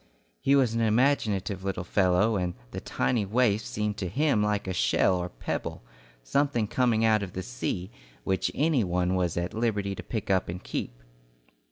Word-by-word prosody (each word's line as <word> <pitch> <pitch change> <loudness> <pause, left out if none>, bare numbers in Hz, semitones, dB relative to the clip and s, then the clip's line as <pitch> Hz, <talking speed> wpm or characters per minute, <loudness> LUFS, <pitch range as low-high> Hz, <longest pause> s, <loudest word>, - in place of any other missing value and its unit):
He 140 - +3
was 130 -5 +3
an 115 - 0
imaginative 110 -5 +1
little 95 -2 -2
fellow, 95 +4 +2
and 90 -2 -1 0.2
the - - -5
tiny 120 -4 0
waif 110 +1 +2
seemed 105 -1 -3
to 95 - -3
him 140 - +2
like 105 -1 0
a 95 - -1
shell 90 +5 +2
or 90 0 -2
a - - -12
pebble, - - -5 0.4
something 140 - +1
coming 115 -1 +2
out 110 -1 +4
of 95 -3 -5
the 95 - -4
sea, 90 - -4 0.3
which 95 +3 0
any 145 -4 +2
one 90 0 0
was 90 -3 0
at 85 +1 -2
liberty 105 -3 0
to - - -6
pick 110 -4 -3
up 95 -2 +1
and 90 +1 -6
keep. - - -5
100 Hz, 185 wpm, -27 LUFS, 90-115 Hz, 0.4 s, out